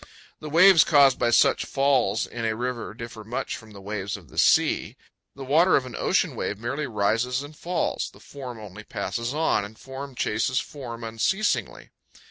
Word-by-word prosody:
The 155 Hz, -, -7 dB
waves 175 Hz, +2 st, +7 dB
caused 140 Hz, -4 st, +5 dB
by 120 Hz, -, +2 dB
such 120 Hz, -, +4 dB
falls 130 Hz, -7 st, +1 dB
in 115 Hz, -1 st, -7 dB
a 110 Hz, -1 st, 0 dB
river 120 Hz, -2 st, -4 dB
differ 115 Hz, -2 st, -8 dB
much 115 Hz, +4 st, -4 dB
from 110 Hz, -, -12 dB
the 100 Hz, -2 st, -12 dB
waves 100 Hz, -1 st, -4 dB
of -, -, -16 dB
the -, -, -4 dB
sea. -, -, +3 dB, 0.4 s
The 135 Hz, -1 st, -8 dB
water 165 Hz, +7 st, +4 dB
of 130 Hz, -, +1 dB
an 125 Hz, -, -8 dB
ocean -, -, +1 dB
wave 105 Hz, -, -3 dB
merely 130 Hz, +7 st, -3 dB
rises 115 Hz, +4 st, 0 dB
and 145 Hz, +2 st, -11 dB
falls; 175 Hz, +3 st, -2 dB
the -, -, -18 dB
form 130 Hz, -4 st, -9 dB
only 105 Hz, 0 st, -10 dB
passes 115 Hz, +3 st, -4 dB
on, 155 Hz, -7 st, +1 dB
and 105 Hz, +2 st, -10 dB
form 135 Hz, 0 st, -8 dB
chases 115 Hz, +3 st, 0 dB
form 120 Hz, -5 st, -8 dB
unceasingly. 115 Hz, -, -1 dB
125 Hz, 180 wpm, -25 LUFS, 110-140 Hz, 0.4 s, waves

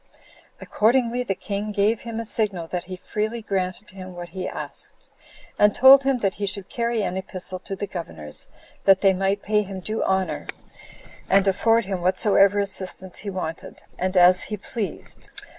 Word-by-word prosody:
Accordingly, 240 Hz, +2 st, +1 dB
the 200 Hz, -6 st, -2 dB
king 205 Hz, +2 st, -4 dB
gave 210 Hz, +2 st, +2 dB
him 230 Hz, -1 st, -5 dB
a 230 Hz, -, -4 dB
signal 205 Hz, -6 st, 0 dB
that 180 Hz, -1 st, -3 dB
he 185 Hz, 0 st, -6 dB
freely 215 Hz, +5 st, -3 dB
granted 190 Hz, 0 st, -3 dB
him 185 Hz, -1 st, -10 dB
what 175 Hz, 0 st, -7 dB
he 185 Hz, +1 st, -5 dB
asked; -, -, -6 dB, 0.5 s
and 210 Hz, 0 st, +5 dB
told 265 Hz, +1 st, +9 dB
him 270 Hz, -1 st, +1 dB
that 195 Hz, -5 st, 0 dB
he 205 Hz, -, -3 dB
should 195 Hz, -1 st, -4 dB
carry 235 Hz, -2 st, -1 dB
an 185 Hz, -1 st, -2 dB
epistle 185 Hz, -1 st, -5 dB
to 195 Hz, -, -6 dB
the 200 Hz, -, -3 dB
governors, 80 Hz, -, -7 dB, 0.4 s
that 195 Hz, -1 st, +6 dB
they 195 Hz, -1 st, +5 dB
might 195 Hz, +2 st, 0 dB
pay 210 Hz, 0 st, +2 dB
him 195 Hz, -2 st, -6 dB
due 215 Hz, +4 st, -3 dB
honor, 190 Hz, -1 st, -1 dB, 0.8 s
and 195 Hz, +1 st, +4 dB
afford 225 Hz, +3 st, +3 dB
him 190 Hz, -2 st, -3 dB
whatsoever 195 Hz, +2 st, +4 dB
assistance 190 Hz, -2 st, 0 dB
he 205 Hz, -, -5 dB
wanted, 180 Hz, -4 st, -6 dB, 0.2 s
and 185 Hz, +1 st, -1 dB
as 180 Hz, +1 st, +6 dB
he 210 Hz, -, -4 dB
pleased. 200 Hz, -2 st, -5 dB
195 Hz, 175 wpm, -24 LUFS, 185-215 Hz, 0.8 s, told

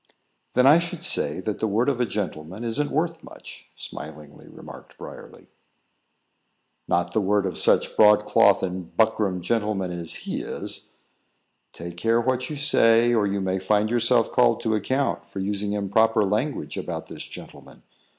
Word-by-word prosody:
"Then 125 Hz, -, +4 dB
I 150 Hz, +5 st, +7 dB
should 170 Hz, 0 st, -5 dB
say 175 Hz, -, +2 dB
that 105 Hz, +2 st, -4 dB
the 110 Hz, -, 0 dB
word 110 Hz, +4 st, 0 dB
of 130 Hz, -3 st, 0 dB
a 120 Hz, -, +1 dB
gentleman 95 Hz, -1 st, -5 dB
isn't 130 Hz, +6 st, -1 dB
worth 165 Hz, +1 st, -2 dB
much," -, -, -12 dB
smilingly 75 Hz, -1 st, -10 dB
remarked -, -, -13 dB
Briarly. -, -, -11 dB, 1.4 s
"Not 85 Hz, 0 st, 0 dB
the 110 Hz, -, +1 dB
word 100 Hz, 0 st, +1 dB
of 90 Hz, -3 st, -3 dB
such -, -, +2 dB
broadcloth 105 Hz, 0 st, +5 dB
and 90 Hz, -2 st, -5 dB
buckram 105 Hz, -5 st, +1 dB
gentlemen 105 Hz, -3 st, -1 dB
as 85 Hz, -2 st, -3 dB
he -, -, -3 dB
is." -, -, -6 dB, 0.8 s
"Take 85 Hz, +1 st, -9 dB
care 115 Hz, +5 st, +2 dB
what 130 Hz, +1 st, -1 dB
you 155 Hz, -, -5 dB
say, 120 Hz, -4 st, +4 dB
or 105 Hz, -3 st, +2 dB
you 100 Hz, 0 st, -2 dB
may 95 Hz, 0 st, -1 dB
find 105 Hz, +3 st, +1 dB
yourself 120 Hz, 0 st, +2 dB
called 120 Hz, -2 st, +3 dB
to 110 Hz, -2 st, 0 dB
account 130 Hz, +6 st, -1 dB
for -, -, -12 dB
using 100 Hz, +1 st, -2 dB
improper 110 Hz, +2 st, +2 dB
language 105 Hz, +9 st, -2 dB
about -, -, -5 dB
this -, -, -8 dB
gentleman. -, -, -12 dB
105 Hz, 160 wpm, -24 LUFS, 95-120 Hz, 1.4 s, I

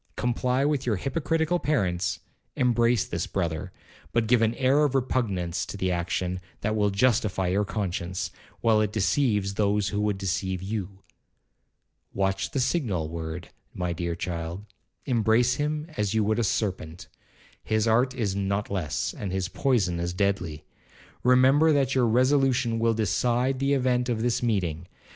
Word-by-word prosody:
Comply 125 Hz, +2 st, 0 dB
with 145 Hz, -3 st, 0 dB
your 110 Hz, -, +2 dB
hypocritical 160 Hz, -, 0 dB
parents, 90 Hz, -, 0 dB, 0.3 s
embrace 120 Hz, -2 st, +2 dB
this 85 Hz, 0 st, -3 dB
brother, 85 Hz, -1 st, -2 dB, 0.4 s
but 115 Hz, -1 st, +1 dB
give 120 Hz, +1 st, +3 dB
an 115 Hz, +1 st, +2 dB
air 135 Hz, +4 st, +3 dB
of 140 Hz, -2 st, +1 dB
repugnance 100 Hz, -10 st, 0 dB
to -, -, -6 dB
the 95 Hz, -1 st, 0 dB
action 90 Hz, +1 st, -2 dB, 0.2 s
that 110 Hz, +1 st, 0 dB
will 105 Hz, -1 st, +2 dB
justify 100 Hz, -3 st, +1 dB
your 100 Hz, +3 st, +1 dB
conscience, 90 Hz, -4 st, -3 dB, 0.3 s
while 110 Hz, -2 st, +4 dB
it 105 Hz, -1 st, 0 dB
deceives 105 Hz, -2 st, +1 dB
those 100 Hz, -1 st, +1 dB
who 105 Hz, +2 st, -1 dB
would 105 Hz, -1 st, 0 dB
deceive 95 Hz, -1 st, -2 dB
you. 100 Hz, -1 st, -5 dB, 1.1 s
Watch 95 Hz, 0 st, 0 dB
the 140 Hz, -, -2 dB
signal 120 Hz, -, 0 dB
word, 80 Hz, +1 st, -6 dB, 0.3 s
my 90 Hz, -1 st, -2 dB
dear 85 Hz, 0 st, -3 dB
child; 85 Hz, +1 st, -5 dB, 0.4 s
embrace 120 Hz, -1 st, +3 dB
him 150 Hz, +1 st, -1 dB
as 105 Hz, 0 st, 0 dB
you 110 Hz, -, +3 dB
would 110 Hz, +2 st, +1 dB
a -, -, +2 dB
serpent,—his 100 Hz, +3 st, -3 dB
art 125 Hz, +4 st, +2 dB
is 105 Hz, -6 st, -1 dB
not 100 Hz, +1 st, -1 dB
less, 90 Hz, -7 st, -2 dB
and 100 Hz, -3 st, -5 dB
his 95 Hz, -1 st, -2 dB
poison 95 Hz, -6 st, +1 dB
as 85 Hz, +1 st, -2 dB
deadly. 90 Hz, -6 st, -1 dB, 0.6 s
Remember 130 Hz, +5 st, +5 dB
that 140 Hz, -2 st, +2 dB
your 125 Hz, -2 st, +3 dB
resolution 125 Hz, -1 st, +2 dB
will 115 Hz, 0 st, +2 dB
decide 120 Hz, +5 st, +1 dB
the 140 Hz, +1 st, +1 dB
event 125 Hz, -2 st, +1 dB
of 115 Hz, -2 st, -1 dB
this 120 Hz, -1 st, +1 dB
meeting. 90 Hz, -8 st, -1 dB
105 Hz, 155 wpm, -26 LUFS, 95-125 Hz, 1.1 s, Remember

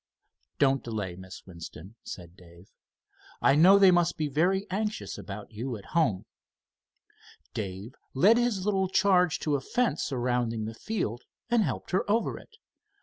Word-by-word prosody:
"Don't 135 Hz, -1 st, +2 dB
delay, 105 Hz, -6 st, -4 dB
Miss 95 Hz, +1 st, -11 dB
Winston," 85 Hz, +1 st, -10 dB
said 85 Hz, -1 st, -9 dB
Dave. 85 Hz, 0 st, -17 dB, 0.7 s
"I 135 Hz, -, +4 dB
know 180 Hz, +7 st, +7 dB
they 195 Hz, -2 st, +7 dB
must 175 Hz, -1 st, +2 dB
be 155 Hz, -, -1 dB
very 180 Hz, +7 st, +1 dB
anxious 210 Hz, +2 st, -3 dB
about 100 Hz, +2 st, -8 dB
you 115 Hz, +2 st, -4 dB
at 100 Hz, -, -14 dB
home." 120 Hz, -, +1 dB, 1.3 s
Dave 100 Hz, +3 st, -5 dB, 0.2 s
led 205 Hz, -, +6 dB
his 225 Hz, -6 st, 0 dB
little 195 Hz, -2 st, +1 dB
charge 180 Hz, -3 st, +3 dB
to 155 Hz, -, -1 dB
the 140 Hz, -, +1 dB
fence 235 Hz, -, 0 dB
surrounding 120 Hz, -3 st, -1 dB
the 110 Hz, -, -5 dB
field 120 Hz, -, -3 dB, 0.3 s
and 235 Hz, -1 st, +4 dB
helped -, -, -3 dB
her 185 Hz, +2 st, 0 dB
over 225 Hz, +3 st, 0 dB
it. 445 Hz, -, -19 dB
135 Hz, 150 wpm, -28 LUFS, -, 1.3 s, know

